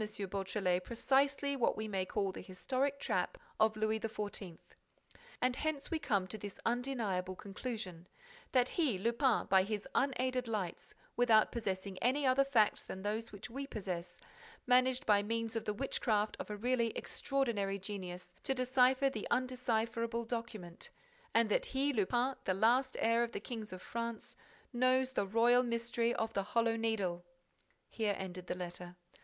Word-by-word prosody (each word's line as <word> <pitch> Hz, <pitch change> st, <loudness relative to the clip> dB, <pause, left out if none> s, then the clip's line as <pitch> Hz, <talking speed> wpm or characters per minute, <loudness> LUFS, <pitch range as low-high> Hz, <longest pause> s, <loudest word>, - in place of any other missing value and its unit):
Beautrelet 190 Hz, -2 st, 0 dB
precisely 275 Hz, +4 st, +1 dB
what 250 Hz, -, +1 dB
we 215 Hz, 0 st, -3 dB
may 190 Hz, -3 st, -1 dB
call 195 Hz, 0 st, 0 dB
the -, -, -8 dB
historic 260 Hz, +9 st, -1 dB
trap -, -, -1 dB, 0.2 s
of 220 Hz, 0 st, +4 dB
Louis 215 Hz, +1 st, +1 dB
XIV. 205 Hz, -5 st, -4 dB, 0.8 s
And 250 Hz, 0 st, +2 dB
hence 310 Hz, -2 st, -2 dB
we 325 Hz, -, 0 dB
come 200 Hz, -10 st, +1 dB
to 215 Hz, +3 st, -6 dB
this 205 Hz, 0 st, -7 dB
undeniable 230 Hz, -7 st, -1 dB
conclusion, 195 Hz, -4 st, -6 dB, 0.4 s
that 255 Hz, -1 st, +4 dB
he, 290 Hz, -, +1 dB
Lupin, 235 Hz, +4 st, +2 dB
by 190 Hz, 0 st, +5 dB
his 205 Hz, +1 st, -3 dB
unaided 255 Hz, -2 st, +1 dB
lights, 205 Hz, -6 st, -4 dB, 0.2 s
without 230 Hz, -3 st, +5 dB
possessing 195 Hz, -4 st, -3 dB
any 270 Hz, +4 st, +2 dB
other 260 Hz, +1 st, +5 dB
facts 235 Hz, -7 st, +3 dB
than 190 Hz, -, -7 dB
those 215 Hz, +2 st, -2 dB
which 205 Hz, +3 st, -9 dB
we 275 Hz, +3 st, -4 dB
possess, 180 Hz, -6 st, -5 dB, 0.5 s
managed 255 Hz, +2 st, +4 dB
by 205 Hz, -2 st, +5 dB
means 230 Hz, +2 st, -2 dB
of 225 Hz, -, -2 dB
the 210 Hz, -, 0 dB
witchcraft 215 Hz, -4 st, 0 dB
of -, -, -5 dB
a 210 Hz, -, -4 dB
really 240 Hz, +1 st, +2 dB
extraordinary 225 Hz, -8 st, -1 dB
genius, 180 Hz, -3 st, -6 dB
to 270 Hz, -, 0 dB
decipher 255 Hz, +1 st, +4 dB
the 225 Hz, -6 st, -3 dB
undecipherable 235 Hz, -2 st, 0 dB
document; 225 Hz, -7 st, -5 dB, 0.4 s
and 230 Hz, 0 st, +4 dB
that -, -, +2 dB
he, 275 Hz, +2 st, +1 dB
Lupin, 240 Hz, +4 st, +1 dB
the 185 Hz, -, +1 dB
last 245 Hz, +6 st, +3 dB
heir 230 Hz, +1 st, +3 dB
of 235 Hz, 0 st, -1 dB
the -, -, -2 dB
Kings 220 Hz, -4 st, -6 dB
of 185 Hz, 0 st, -8 dB
France, 230 Hz, -1 st, -4 dB, 0.4 s
knows 255 Hz, +1 st, +3 dB
the 200 Hz, -6 st, 0 dB
royal 235 Hz, +4 st, +5 dB
mystery 235 Hz, -1 st, 0 dB
of 225 Hz, 0 st, -1 dB
the 200 Hz, -, +1 dB
Hollow 230 Hz, +3 st, +1 dB
Needle! 205 Hz, -6 st, -1 dB, 0.6 s
Here 210 Hz, -3 st, -1 dB
ended 185 Hz, -1 st, -6 dB
the -, -, -2 dB
letter. 180 Hz, 0 st, -6 dB
225 Hz, 160 wpm, -35 LUFS, 200-255 Hz, 0.8 s, by